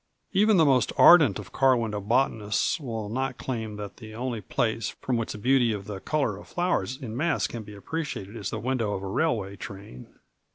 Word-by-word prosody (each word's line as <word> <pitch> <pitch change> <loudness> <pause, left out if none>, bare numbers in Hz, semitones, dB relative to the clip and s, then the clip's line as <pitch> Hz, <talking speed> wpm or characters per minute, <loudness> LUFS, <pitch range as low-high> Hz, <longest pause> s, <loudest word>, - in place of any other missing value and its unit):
Even 210 +1 +4
the 160 - +6
most 130 -5 +3
ardent 150 - +7
of 100 -3 -9
car 130 -2 +4
window 110 -3 -2
botanists 110 - +1
will 115 -7 -4
not 130 +3 -2
claim 110 -4 -4
that 105 -1 -7
the 110 -1 -10
only 120 -2 -3
place 110 0 -1
from 130 - -1
which 115 -1 -2
the - - -7
beauty 125 +1 +3
of 100 -2 -5
the 100 -2 -6
color 135 -5 -1
of - - -12
flowers 175 -7 -1
in 115 -6 -6
mass 160 +6 +1
can 115 - -5
be 105 -1 -11
appreciated 115 -4 -5
is 105 -4 -4
the - - -4
window 120 -4 -1
of 95 - -5
a - - -4
railway 100 -5 0
train. 95 -10 -9
115 Hz, 205 wpm, -26 LUFS, 105-135 Hz, -, ardent